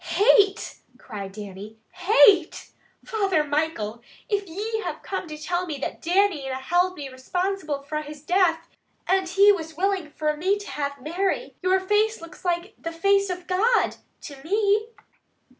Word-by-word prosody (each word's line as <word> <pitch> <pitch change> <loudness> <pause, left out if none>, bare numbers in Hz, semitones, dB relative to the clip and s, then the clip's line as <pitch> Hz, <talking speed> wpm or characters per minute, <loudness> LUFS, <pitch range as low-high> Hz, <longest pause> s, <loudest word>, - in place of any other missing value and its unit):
"Hate!" 405 -1 +4 0.2
cried 200 -2 -8
Dannie. 205 +1 -9
"Hate! 365 -1 +4 0.3
Father 390 -8 +1
Michael, 290 -7 -2 0.3
if 405 -3 -1
ye 425 +6 -3
have - - -5
come 380 -2 -4
to 305 -1 -7
tell 350 +4 -2
me 305 -3 -4
that 275 - -5
Jimmy 350 -5 +1
na 260 - -2
held 355 +7 +1
me 285 -2 -5
responsible 305 +3 -3
fra 305 +2 -3
his 300 -1 -10
death, 335 -1 +2 0.4
and 375 -1 +1 0.2
was 320 -3 -8
willing 380 -3 0
fra 300 0 -1
me 375 +7 +1
to 410 - -9
have 280 -1 -3
Mary, 350 +8 -2
your 375 +1 +3
face 420 +3 +1
looks 335 +2 -12
like 350 +2 -1
the 330 - -5
face 395 +4 +2
of 360 -1 -5
God 435 +7 +2 0.2
to 280 -2 -10
me!" 415 +4 +1
355 Hz, 155 wpm, -24 LUFS, 300-395 Hz, 0.4 s, Hate